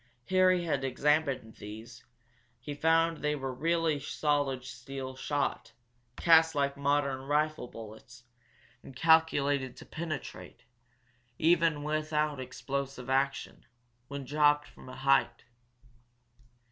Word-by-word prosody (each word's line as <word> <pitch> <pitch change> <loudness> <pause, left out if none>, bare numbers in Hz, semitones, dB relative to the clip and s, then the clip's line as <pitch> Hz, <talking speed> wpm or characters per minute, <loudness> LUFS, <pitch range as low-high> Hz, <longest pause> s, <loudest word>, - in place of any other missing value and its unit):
Harry 185 -1 +4
had 145 -5 -1
examined 135 -4 0
these 110 +3 -10 0.6
he 135 +5 -6
found 165 +2 +2
they 150 0 -1
were 135 -2 -4
really 165 +1 +1
solid 145 -3 -1
steel 130 +1 -7
shot, 145 +1 -2 0.4
cast 160 -1 +5
like 140 -1 0
modern 140 -1 0
rifle 150 0 0
bullets, 115 +2 -12 0.6
and 135 - -13
calculated 145 -4 +3
to - - -11
penetrate, 155 -2 -7 0.7
even 165 -2 +3
without 150 -1 -1
explosive 135 0 -5
action, 135 +1 -1 0.4
when 140 0 -6
dropped 145 +1 +3
from - - -14
a - - -9
height. 135 -3 +2
145 Hz, 110 wpm, -30 LUFS, 130-155 Hz, 0.7 s, cast